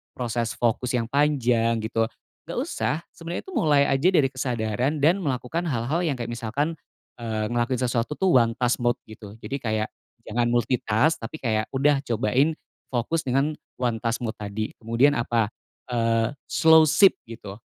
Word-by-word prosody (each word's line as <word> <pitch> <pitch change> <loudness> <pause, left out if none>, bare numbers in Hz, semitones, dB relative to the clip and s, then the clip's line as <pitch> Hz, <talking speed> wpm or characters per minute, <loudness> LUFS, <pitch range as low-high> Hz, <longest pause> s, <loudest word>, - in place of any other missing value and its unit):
proses 120 -2 -2
fokus 120 +1 0
yang 120 - +1
panjang 120 -6 +2
gitu. 110 0 0 0.4
Nggak - - -5
usah. - - -1 0.2
Sebenernya 170 +1 -6
itu 380 - -11
mulai 150 - +3
aja 135 +4 +2
dari 150 -8 +3
kesadaran 125 +2 -1
dan 170 +6 +4
melakukan 155 +2 -2
hal-hal 130 +3 -1
yang 165 -6 0
kayak 120 -2 -5
misalkan, 140 +7 -2 0.4
eee, 110 -2 -2
ngelakuin 120 +1 0
sesuatu 120 +3 -1
tuh 185 -7 +4
one 115 -1 +1
task 125 +1 +1
mode 120 0 +2
gitu. 105 -1 -12
Jadi 140 +1 -4
kayak 110 -2 -2 0.3
jangan 120 +2 0
multitask, 120 +3 +1
tapi 130 +6 -8
kayak 110 -2 0
udah 140 +1 +3
cobain 125 +7 +1 0.3
fokus 135 +5 -2
dengan 135 +4 +2 0.2
one 120 -3 -1
task 115 +1 -2
mode 110 -1 -3
tadi. 105 +1 -4
Kemudian 115 +5 +3
apa, 115 -2 0 0.4
eee, 115 -1 +1 0.2
slowship 160 +4 +6
gitu. 105 -3 -9
120 Hz, 155 wpm, -25 LUFS, 115-145 Hz, 0.4 s, slowship